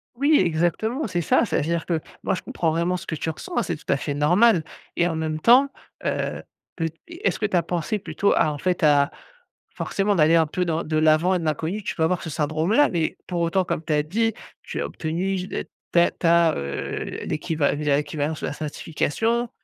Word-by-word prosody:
Oui 285 +4 +4
exactement, 180 - 0
c'est 175 -4 -1
ça. 160 - +3
Ça - - -1
veut - - +1
dire 165 +2 -1
que 165 -3 +1 0.2
moi - - +1
je - - -6
comprends 165 - -1
vraiment 170 +3 0
ce 180 - -10
que 160 - -2
tu 160 - -3
ressens, 360 - -7
hein, 240 - +3
c'est 170 - -2
tout 150 - -5
à - - +3
fait 145 +1 -3
normal 175 +6 +4 0.3
et 170 - +2
en 165 - -2
même 155 -1 -2
temps, 250 - +6 0.4
heu, - - -2 0.3
peu 165 -2 -1 0.2
est-ce 345 +4 -2
que 215 - +1
tu 190 - +1
as 170 - +2
pensée 175 +5 -2
plutôt 200 0 0
à 155 - +2
en 145 - -7
fait 180 +2 -1
à 145 -2 +5 0.7
forcément 200 +1 0
d'aller 160 -1 +5
un 165 -1 +5
peu 180 +4 -1
dans 165 -1 -1
de 155 0 -1
l'avant 155 +4 +4
et - - +1
de 165 - -5
l'inconnu, 160 +7 -1
tu 210 - -3
peux 160 - 0
avoir 175 +2 +1
ce 165 - -5
syndrome 155 +4 0
là? 290 +4 +5
Mais 165 -3 -1
pour 175 -2 -2
autant 180 +3 +1
comme 160 - -2
tu 155 - -1
as 150 - +2
dit: 225 +8 0 0.3
«Tu - - -6
as - - -1
obtenu 180 +5 -2 0.5
ta 170 0 +4
ta, 170 -1 +3
heu, 70 0 -4
l'équival 150 -2 -1
l'équivalence 150 +1 -1
de - - -2
la - - -3
certification» 195 +10 -1
170 Hz, 220 wpm, -24 LUFS, 155-190 Hz, 0.7 s, temps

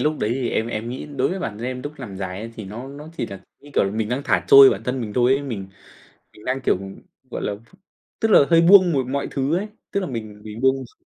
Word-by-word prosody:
lúc 150 0 0
đấy 105 - -1
thì 130 -3 -2
em 110 - 0
em 115 0 -4
nghĩ 125 +4 -6
đối - - +2
với 190 - -3
bản 110 - -5
thân 120 - -4
em 125 0 -4
lúc 145 - -5
nằm 105 -7 -7
dài 95 0 -5
ấy, 115 +1 -7
thì 110 - -7
nó 115 +7 -8
nó 145 +2 -10
chỉ - - -2
là, 100 -1 -9 0.2
như 145 - -15
kiểu - - +4
là, 95 - -1
mình 110 +1 -2
đang 125 +4 -2
thả 100 -8 +1
trôi 135 -1 +10
bản 105 -1 -3
thân 125 +1 -2
mình 105 -3 -5
thôi 125 +1 +3
ấy, 135 +1 +1
mình 110 -9 -5 0.7
mình 105 - -16
đang, 130 +1 -1
kiểu, - - +2 0.5
gọi - - -4
là, 105 - -2 0.6
tức 225 - +1
là - - +8
hơi 165 0 +6
buông 185 0 +7
một 135 -3 0
mọi 140 +2 -2
thứ 140 +4 0
ấy, 205 +3 -3 0.2
tức 200 - 0
là 185 - -3
mình 110 -5 -7
mình 110 +2 -8
buông 130 0 +4
x - - -21
125 Hz, 280 wpm, -22 LUFS, 110-140 Hz, 0.7 s, trôi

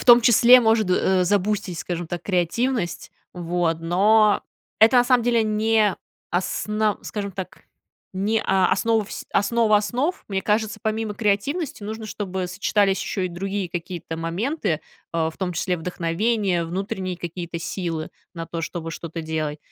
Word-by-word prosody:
в - - -6
том 240 -1 +9
числе 240 +2 +7
может, 220 -4 +2
э, 185 0 +3
забустить, 200 -2 0
скажем 175 -1 -4
так, 175 +1 -5
креативность. 190 +3 -1 0.2
Вот. 175 -2 -1
Но 205 +5 +4 0.4
это, 230 +4 +6
на 245 - +5
самом 250 -1 +3
деле, 235 -1 +2
не 215 -1 +2 0.4
асна 210 +4 0
скажем 200 -2 -5
так, 185 0 -8 0.5
не 210 +4 +1
о 190 -1 +3
основа 225 -2 +2
всь - - -7
основа 215 +1 +3
основ. 250 - -1
Мне 190 -1 -1
кажется, 215 0 0
помимо 220 -1 -2
креативности, 245 - -1
нужно, 220 +1 -5
чтобы 190 -3 -4
сочетались 195 +1 +1
ещё 195 - -3
и 185 - 0
другие 190 +2 -3
какие-то 170 -1 -5
моменты, 190 - -2 0.5
э, 160 -1 +1
в - - -20
том 185 -2 -2
числе 180 +1 -1
вдохновение, 180 +3 0
внутренние 185 +1 -3
какие-то 170 0 -5
силы 170 -2 -4 0.3
на 165 0 -5
то, 165 0 -5
чтобы 165 0 -5
что-то 165 +1 -6
делать. 155 -1 -3
195 Hz, 150 wpm, -23 LUFS, 175-220 Hz, 0.5 s, том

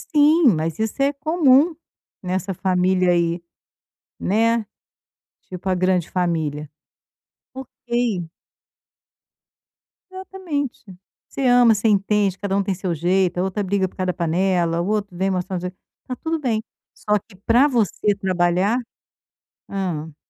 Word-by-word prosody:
Sim, 300 +2 +5
mas 160 +3 -3
isso 220 +4 -2
é 275 +1 +3
comum 310 +1 +3 0.5
nessa 185 +1 -2
família 185 0 +2
aí, 170 0 +1 0.8
né, 230 +3 +1 0.8
tipo 185 +1 -7
a 185 - +2
grande 180 -1 +1
família 160 -5 -1 0.9
ok. 235 -8 -3 1.8
Exatamente, 375 -10 -5 0.4
você 275 - -6
ama, 245 -2 +6
você 210 +3 0
entende, 200 -1 +1
cada 200 -1 -2
um 200 - +2
tem 195 - -1
seu 180 -1 -3
jeito, 180 +2 +1
a - - +1
outra 190 +2 -2
briga 190 -1 0
por - - -24
causa 185 - -2
da 180 - 0
panela, 170 0 0
o 175 - -3
outro 205 -3 -2
vem 190 +2 0
mostrar, 185 0 -2
está 180 +7 -8
tudo 325 -1 -1
bem, 225 -6 -1 0.3
só 210 0 0
que 200 0 -20
para 245 +5 +5
você 215 - +1
trabalhar 185 +4 +1 0.9
hã 160 -6 -4
195 Hz, 130 wpm, -21 LUFS, 180-235 Hz, 1.8 s, ama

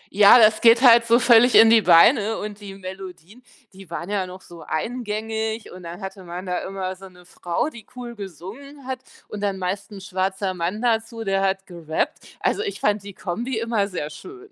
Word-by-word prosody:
Ja, 205 +3 +8
das 215 -2 +5
geht 230 +2 +6
halt 235 -2 +7
so 230 - +5
völlig 245 0 +5
in 225 0 +8
die 230 - +6
Beine 205 - +5
und 210 -1 -7
die 195 -1 -9
Melodien, 190 +2 -10 0.3
die 190 -2 -14
waren 170 +3 -6
ja 195 -3 -1
noch 185 +1 -11
so 170 -1 -14
eingängig 220 +3 -4
und 185 - -11
dann 175 +2 -9
hatte 190 0 -8
man 175 +1 -7
da 180 -1 -2
immer 190 -1 -5
so 190 +1 -13
'ne 180 -1 -19
Frau, 175 - -3
die 225 -3 -13
cool 245 -1 -7
gesungen 210 - -10
hat 260 -1 -4 0.3
und 205 - -7
dann 200 -2 -1
meist 190 +3 -4
'n 195 - -10
schwarzer 190 0 -2
Mann 180 +6 -3
dazu, 225 -1 -1
der 195 -2 0
hat 195 0 -1
gerappt. 165 -3 -4
Also, - - 0
ich 410 -2 -4
fand 210 0 0
die 200 -1 -11
Kombi 230 +7 -4
immer 225 -3 -1
sehr 165 -6 -5
schön. 385 - -12
200 Hz, 205 wpm, -22 LUFS, 185-230 Hz, 0.3 s, Ja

